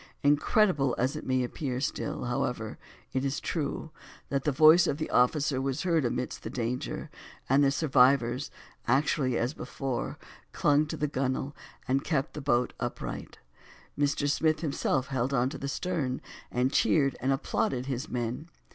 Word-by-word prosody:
Incredible 145 Hz, -, +3 dB
as 130 Hz, +5 st, 0 dB
it 155 Hz, -, -6 dB
may 130 Hz, -1 st, +2 dB
appear, 125 Hz, 0 st, -3 dB
still, 135 Hz, -, -2 dB
however, 120 Hz, -3 st, -2 dB, 0.3 s
it 130 Hz, -, 0 dB
is 135 Hz, 0 st, -1 dB
true, 160 Hz, 0 st, -3 dB, 0.4 s
that 140 Hz, -1 st, -1 dB
the 150 Hz, -, +3 dB
voice 155 Hz, +5 st, +7 dB
of 140 Hz, -, 0 dB
the 155 Hz, -, -4 dB
officer 135 Hz, +2 st, +2 dB
was 135 Hz, +3 st, -2 dB
heard 165 Hz, -6 st, +2 dB
amidst 120 Hz, +1 st, -2 dB
the -, -, -5 dB
danger; 125 Hz, 0 st, -3 dB, 0.4 s
and 135 Hz, +2 st, +4 dB
the 140 Hz, -, +5 dB
survivors, 135 Hz, -2 st, +3 dB, 0.4 s
actually 135 Hz, -1 st, +2 dB
as 120 Hz, +5 st, 0 dB
before, 135 Hz, -5 st, -4 dB, 0.4 s
clung 145 Hz, +1 st, +3 dB
to -, -, -5 dB
the 150 Hz, -, 0 dB
gun 130 Hz, -2 st, 0 dB
wale, 140 Hz, +2 st, -5 dB, 0.3 s
and 135 Hz, +2 st, +1 dB
kept 150 Hz, -3 st, -1 dB
the 150 Hz, -, -6 dB
boat 125 Hz, -3 st, +1 dB
upright. -, -, -5 dB, 0.6 s
Mr. 145 Hz, 0 st, +1 dB
Smith 155 Hz, +1 st, +2 dB
himself 140 Hz, -4 st, 0 dB
held 130 Hz, -2 st, 0 dB, 0.2 s
to -, -, -6 dB
the 140 Hz, -, -4 dB
stern, 145 Hz, -5 st, -2 dB, 0.3 s
and 125 Hz, +3 st, 0 dB
cheered 140 Hz, -4 st, +3 dB
and 130 Hz, +2 st, +1 dB
applauded 130 Hz, -1 st, 0 dB
his 135 Hz, +2 st, -3 dB
men. 125 Hz, +6 st, -3 dB
135 Hz, 160 wpm, -29 LUFS, 125-150 Hz, 0.6 s, voice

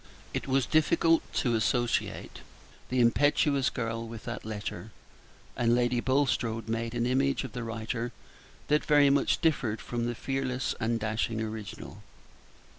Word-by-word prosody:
It -, -, -3 dB
was 135 Hz, -1 st, +2 dB
difficult 165 Hz, +1 st, +3 dB
to 120 Hz, -, +1 dB
associate 120 Hz, +2 st, 0 dB, 0.5 s
the 125 Hz, -, 0 dB
impetuous 140 Hz, +2 st, +3 dB
girl 115 Hz, -2 st, -3 dB
with 115 Hz, -1 st, -9 dB
that 120 Hz, -, -5 dB
letter, 105 Hz, -1 st, -5 dB, 0.7 s
and 120 Hz, -1 st, +3 dB
Lady 120 Hz, 0 st, +2 dB
Bulstrode 120 Hz, -4 st, 0 dB
made 115 Hz, +1 st, -2 dB
an 120 Hz, 0 st, 0 dB
image 135 Hz, +3 st, +1 dB
of 130 Hz, -, -6 dB
the 125 Hz, -2 st, -5 dB
writer 115 Hz, +1 st, -3 dB, 0.6 s
that 150 Hz, +1 st, +3 dB
very 145 Hz, -2 st, +5 dB
much 140 Hz, -, +2 dB
differed 130 Hz, -9 st, +1 dB
from 120 Hz, -1 st, -3 dB
the 120 Hz, -, -2 dB
fearless 130 Hz, 0 st, -2 dB
and 115 Hz, +1 st, 0 dB
dashing 110 Hz, +1 st, -1 dB
original. 110 Hz, -1 st, -6 dB
120 Hz, 140 wpm, -29 LUFS, 115-135 Hz, 0.7 s, very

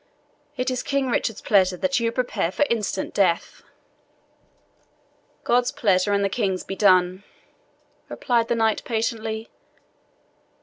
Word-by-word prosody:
It 255 Hz, +1 st, -1 dB
is 255 Hz, -, -2 dB
King 275 Hz, -2 st, -1 dB
Richard's 225 Hz, -2 st, -1 dB
pleasure 185 Hz, -3 st, +3 dB
that 275 Hz, +3 st, 0 dB
you 230 Hz, 0 st, 0 dB
prepare 230 Hz, -8 st, -1 dB
for 290 Hz, -, +1 dB
instant 210 Hz, -4 st, -2 dB
death." 180 Hz, -4 st, 0 dB, 1.8 s
"God's 245 Hz, +1 st, +2 dB
pleasure 195 Hz, -2 st, +1 dB
and 200 Hz, 0 st, +2 dB
the -, -, +3 dB
King's 195 Hz, -3 st, -2 dB
be 195 Hz, -, -6 dB
done," 185 Hz, -1 st, +3 dB, 0.9 s
replied 235 Hz, -3 st, 0 dB
the 235 Hz, -, 0 dB
knight 225 Hz, -1 st, +1 dB
patiently. 225 Hz, -1 st, -3 dB
220 Hz, 125 wpm, -23 LUFS, 195-240 Hz, 1.8 s, pleasure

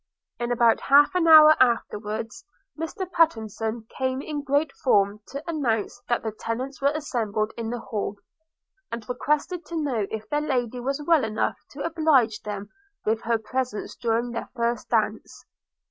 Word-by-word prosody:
In 240 Hz, 0 st, -2 dB
about 235 Hz, -1 st, +4 dB
half 285 Hz, +4 st, +5 dB
an 360 Hz, -2 st, +2 dB
hour 310 Hz, -1 st, +9 dB
afterwards 225 Hz, -, 0 dB, 0.3 s
Mr 325 Hz, +5 st, -4 dB
Pattenson 225 Hz, -, 0 dB
came 260 Hz, 0 st, -1 dB
in 295 Hz, +1 st, -4 dB
great 285 Hz, +1 st, +1 dB
form 205 Hz, -4 st, +3 dB
to 280 Hz, +4 st, -8 dB
announce 245 Hz, -8 st, -1 dB
that 240 Hz, -, +1 dB
the 220 Hz, -, -2 dB
tenants 250 Hz, +6 st, -5 dB
were 280 Hz, +1 st, +3 dB
assembled 220 Hz, -8 st, -2 dB
in 230 Hz, -1 st, -4 dB
the 245 Hz, -, -3 dB
hall, 205 Hz, -3 st, -3 dB, 0.8 s
and 230 Hz, -1 st, -6 dB
requested 300 Hz, +7 st, -1 dB
to 340 Hz, -, -6 dB
know 245 Hz, -9 st, -1 dB
if 220 Hz, 0 st, -6 dB
their 295 Hz, +5 st, 0 dB
Lady 250 Hz, -4 st, -1 dB
was 275 Hz, +4 st, -2 dB
well 325 Hz, -3 st, +4 dB
enough 220 Hz, -1 st, -1 dB
to -, -, -6 dB
oblige 300 Hz, -10 st, +2 dB
them 205 Hz, -1 st, -6 dB, 0.4 s
with 220 Hz, +1 st, +1 dB
her 230 Hz, 0 st, +1 dB
presence 245 Hz, 0 st, -4 dB
during 235 Hz, 0 st, -1 dB
their 230 Hz, -, -5 dB
first 235 Hz, 0 st, -1 dB
dance. -, -, -1 dB
245 Hz, 160 wpm, -25 LUFS, 220-290 Hz, 0.8 s, hour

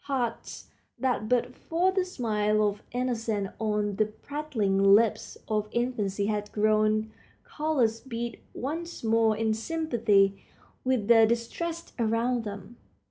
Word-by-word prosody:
Hearts 250 Hz, -5 st, -3 dB, 0.3 s
that 240 Hz, -4 st, -1 dB
but 250 Hz, -1 st, +1 dB
for 350 Hz, +3 st, 0 dB
the 375 Hz, -1 st, 0 dB
smile 215 Hz, -, 0 dB
of 205 Hz, 0 st, -3 dB
innocence 230 Hz, -5 st, -1 dB
on 210 Hz, -2 st, -1 dB
the 215 Hz, -, +2 dB
prattling 215 Hz, -6 st, +2 dB
lips 225 Hz, 0 st, +1 dB
of 215 Hz, -1 st, 0 dB
infancy 210 Hz, -5 st, -1 dB
had 210 Hz, 0 st, -2 dB
grown 215 Hz, 0 st, +2 dB, 0.4 s
callous 265 Hz, -8 st, +1 dB
beat 235 Hz, -1 st, -5 dB, 0.2 s
once 330 Hz, +5 st, -5 dB
more 225 Hz, -1 st, +3 dB
in 220 Hz, 0 st, +1 dB
sympathy 220 Hz, -8 st, +1 dB, 0.4 s
with 255 Hz, -5 st, 0 dB
the 225 Hz, -1 st, +7 dB
distressed 325 Hz, +9 st, -3 dB
around 230 Hz, +1 st, +1 dB
them. 205 Hz, +3 st, -8 dB
225 Hz, 125 wpm, -28 LUFS, 210-255 Hz, 0.4 s, the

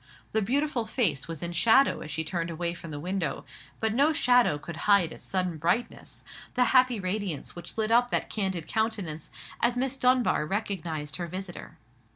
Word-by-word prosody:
The 220 Hz, -, +1 dB
beautiful 255 Hz, +1 st, 0 dB
face 185 Hz, -, +1 dB
was 165 Hz, -2 st, -6 dB
in 170 Hz, -, -2 dB
shadow 235 Hz, +9 st, +4 dB
as 150 Hz, -, -8 dB
she 160 Hz, +2 st, -2 dB
turned 170 Hz, +1 st, -3 dB
away 170 Hz, +1 st, -2 dB
from 170 Hz, -1 st, -9 dB
the 145 Hz, -1 st, -5 dB
window; 175 Hz, -3 st, -3 dB, 0.3 s
but 220 Hz, -1 st, 0 dB
no 280 Hz, +6 st, +4 dB
shadow 245 Hz, -, +4 dB
could 165 Hz, +3 st, -8 dB
hide 195 Hz, -5 st, +5 dB
its -, -, -9 dB
sudden 180 Hz, -4 st, -1 dB
brightness, 185 Hz, +10 st, -2 dB, 0.3 s
the 250 Hz, -, +4 dB
happy 255 Hz, -3 st, +5 dB
radiance 185 Hz, -4 st, -3 dB
which 175 Hz, +4 st, -7 dB
lit 220 Hz, 0 st, 0 dB
up 245 Hz, +1 st, +4 dB
that -, -, 0 dB
candid 190 Hz, -6 st, -2 dB
countenance, 210 Hz, -8 st, -2 dB, 0.3 s
as 240 Hz, +1 st, +2 dB
Miss 265 Hz, +1 st, -1 dB
Dunbar 250 Hz, -11 st, +2 dB
recognized 170 Hz, -8 st, -3 dB
her 175 Hz, -1 st, -4 dB
visitor. 185 Hz, +1 st, -8 dB
195 Hz, 180 wpm, -28 LUFS, 165-235 Hz, 0.3 s, hide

